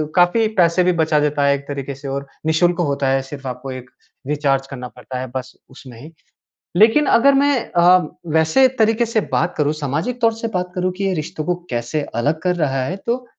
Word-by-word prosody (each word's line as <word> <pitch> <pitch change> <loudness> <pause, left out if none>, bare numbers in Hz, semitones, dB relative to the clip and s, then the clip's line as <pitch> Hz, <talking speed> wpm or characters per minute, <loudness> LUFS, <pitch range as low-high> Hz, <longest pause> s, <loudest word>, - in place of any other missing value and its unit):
काफ़ी 180 +6 +4
पैसे 175 0 +4
भी 180 - +3
बचा 155 -1 +2
देता 150 -1 0
है 140 - +4
एक 140 0 -9
तरीके 140 -1 -5
से 140 +1 -9
और 140 +1 -4 0.2
निःशुल्क 175 +2 +2
होता 140 -4 0
है 135 0 +2
सिर्फ 135 0 -10
आपको 125 +1 -6
एक 125 -1 -8 0.4
रिचार्ज 140 -2 0
करना 125 -2 -7
पड़ता 125 +1 -8
है 130 - -4
बस, 130 0 -5 0.2
उसमें 130 -3 -13
ही। 155 - -11 0.7
लेकिन 225 +9 +5
अगर 275 +2 +5
मैं 275 -3 +1
अ, 175 +1 +6 0.3
वैसे 160 +12 +4
तरीके 225 +2 +3
से 225 -1 0
बात 170 - 0
करूँ 150 0 +1
सामाजिक 155 - -3
तौर 230 -1 +3
से 230 +1 -4
बात 180 0 -2
करूँ 185 0 0
कि 200 - -3
ये 195 - +1
रिश्तों 155 -1 -4
को 180 - 0
कैसे 120 +6 -2
अलग 145 +7 0
कर 180 0 0
रहा 135 -6 0
है, 175 +9 -3
तो 240 +5 -3
155 Hz, 210 wpm, -19 LUFS, 135-185 Hz, 0.7 s, अ